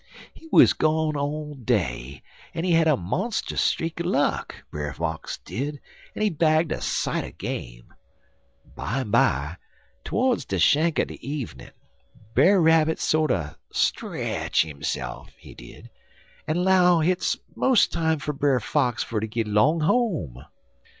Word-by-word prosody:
He 325 - -15
wuz - - +7
gone 155 0 +1
all 150 +1 -3
day, 80 - -2 0.3
en 165 - -2
he 180 - +1
had 165 -1 +4
a 150 -4 +4
monstus 185 - -2
streak 165 +1 -1
er - - -2
luck, 145 -5 0 0.2
Brer 75 -1 -4
Fox 80 +1 -4
did, 145 +3 -5 0.4
en - - -2
he 215 - +3
bagged 160 0 +2
a - - -3
sight - - -1
er - - -7
game. - - -7 0.8
Bimeby, 90 - 0 0.5
to'rds 245 - 0
de 95 - -2
shank 155 - +3
er - - +3
de - - -10
evenin', 135 - -6 0.6
Brer 185 +11 +5
Rabbit 160 -1 +3
sorter 125 - 0
stretch - - 0
hisse'f, 65 -4 -5
he - - -14
did, - - -13 0.6
en 170 +3 0
'low 180 -2 +4
hit's 180 +3 +1 0.2
mos' 260 -4 +4
time 160 -1 0
fer 150 +1 -4
Brer 140 -2 +2
Fox 120 +1 0
fer 110 - -3
ter 110 - -3
git 115 +1 -2
'long 140 +11 +3
home. 155 - 0
150 Hz, 145 wpm, -24 LUFS, 100-165 Hz, 0.8 s, wuz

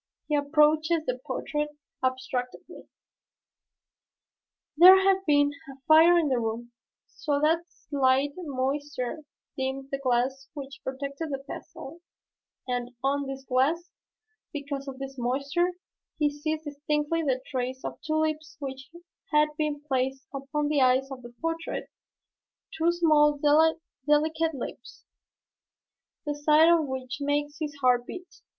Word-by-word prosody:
He 300 - +1
approaches 305 +2 +3
the 250 0 -2
portrait 295 +3 -3 0.3
abstractedly. 255 -1 -3 1.9
There 365 +4 +10
had 385 0 +3
been 290 -1 +4 0.2
a 270 - -14
fire 325 +3 +7
in 330 -3 +2
the 255 -2 +1
room, 230 +1 -4 0.3
so 290 -3 -2
that 315 +3 +3
a - - -21
slight 275 -3 +1
moisture 280 -3 -3 0.4
dimmed 265 0 -3
the 275 - -2
glass 260 +1 0
which 275 -2 -8
protected 280 +4 -4
the 275 -1 -4
pastel, 330 +5 -9 0.7
and 245 0 -3
on 280 +1 0
this 270 0 -6
glass, 300 +8 +1 0.6
because 280 -2 -5
of 265 -1 -6
this 270 0 -7
moisture, 280 +8 0 0.4
he 295 -2 +2
sees 310 +2 -3
distinctly 295 +2 -1
the 265 -5 0
trace 260 0 -3
of - - -6
two 310 -1 -2
lips 315 0 -1
which 265 -2 -7 0.4
had 300 0 +4
been 300 -1 -2
placed 265 0 -1
upon 280 +2 -2
the 295 -2 +2
eyes 260 +1 +3
of 260 -1 -7
the 240 0 -12
portrait, 330 0 -3 0.8
two 325 +2 +2
small 305 -4 +4
delicate 315 +1 +2
lips, 260 - -8 1.2
the 295 - -1
sight 300 +2 +5
of 320 -3 +2
which 260 0 -5
makes 290 +1 -1
his 305 -1 -4
heart 245 -1 +3
beat. 365 0 -9
290 Hz, 130 wpm, -27 LUFS, 265-310 Hz, 1.9 s, There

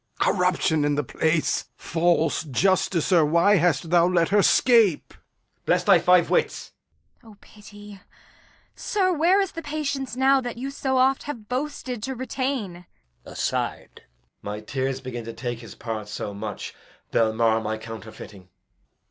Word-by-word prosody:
Corruption 180 -4 +1
in 145 0 +1
the 150 - -1
place! 160 +4 0
False 165 -1 0
justicer, 175 +2 +2
why 170 +7 +4
hast 170 -1 +1
thou 175 -1 +5
let 175 -2 +2
her 205 +1 +4
scape? 225 - +3
Edg. - - -32
Bless - - +2
thy - - +5
five 180 -1 +3
wits! 485 - 0 0.5
Kent. 225 -3 -16
O - - -22
pity! 205 -1 -14 0.7
Sir, 375 -3 0
where 345 +5 +3
is 390 -2 0
the 330 - -7
patience 285 -4 -4
now 265 +1 +3
That 245 -2 -6
you 270 +3 -5
so 265 -1 -1
oft 260 +1 +3
have 225 -7 -7
boasted 255 -3 -4
to 265 +4 -4
retain? 250 -9 -4 0.4
Edg. - - -10
[aside] - - -3 0.4
My 105 +1 -5
tears 135 +3 -3
begin 125 -2 -6
to 115 - -7
take 120 -1 -5
his 115 - -11
part 110 -3 -5
so 105 -1 -5
much 105 0 -6 0.4
They'll 110 -1 +2
mar 115 0 +1
my 110 0 -3
counterfeiting. 110 -4 -11
180 Hz, 155 wpm, -24 LUFS, -, 0.7 s, thou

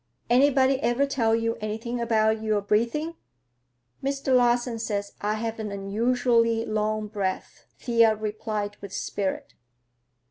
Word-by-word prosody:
—Anybody 265 +1 +4
ever 240 +4 +2
tell 230 -5 +1
you 230 0 -1
anything 225 +3 -3
about 220 -1 +2
your 215 -1 +1
breathing?" 235 +11 0 0.9
"Mr. 275 -1 0
Larsen 240 -1 +2
says 205 -2 -3
I 210 +1 0
have 225 +1 -4
an 215 -2 -4
unusually 230 +3 +1
long 215 0 -1
breath," 200 -3 -4
Thea 230 -3 +3
replied 210 -1 -4
with 200 -1 -9
spirit. 195 -2 -3
225 Hz, 120 wpm, -26 LUFS, 210-240 Hz, 0.9 s, Anybody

